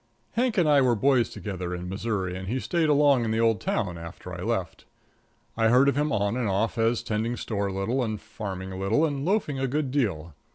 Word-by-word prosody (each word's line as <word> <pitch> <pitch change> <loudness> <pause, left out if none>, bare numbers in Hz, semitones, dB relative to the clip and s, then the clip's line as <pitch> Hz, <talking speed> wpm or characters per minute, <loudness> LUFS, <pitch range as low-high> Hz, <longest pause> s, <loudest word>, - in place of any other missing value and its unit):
Hank 240 0 0
and 175 -4 +4
I 145 -2 +5
were 125 -2 +3
boys 130 +1 +3
together 90 -4 -5
in 90 0 -6
Missouri, 95 -1 -2
and 95 0 -6
he 125 +6 -1
stayed 165 +2 0
along 145 -4 +4
in 115 - -1
the 110 +1 0
old 115 -3 +2
town 90 -7 -2
after 85 0 -9
I - - -6
left. - - -3 0.7
I 115 -1 +3
heard 125 +4 +5
of 140 - +3
him 150 +1 +1
on 100 +1 0
and 125 -4 -1
off 110 +5 0
as 115 +1 +2
tending 115 +3 -2
store 100 -3 -2
a - - -3
little, 115 +7 -1
and 110 -3 -3
farming 95 -4 -6
a 95 - -6
little, 110 +11 +2
and 140 -3 -2
loafing 175 -6 0
a 135 - 0
good 140 0 -1
deal. 95 - -1
115 Hz, 230 wpm, -26 LUFS, 95-140 Hz, 0.7 s, I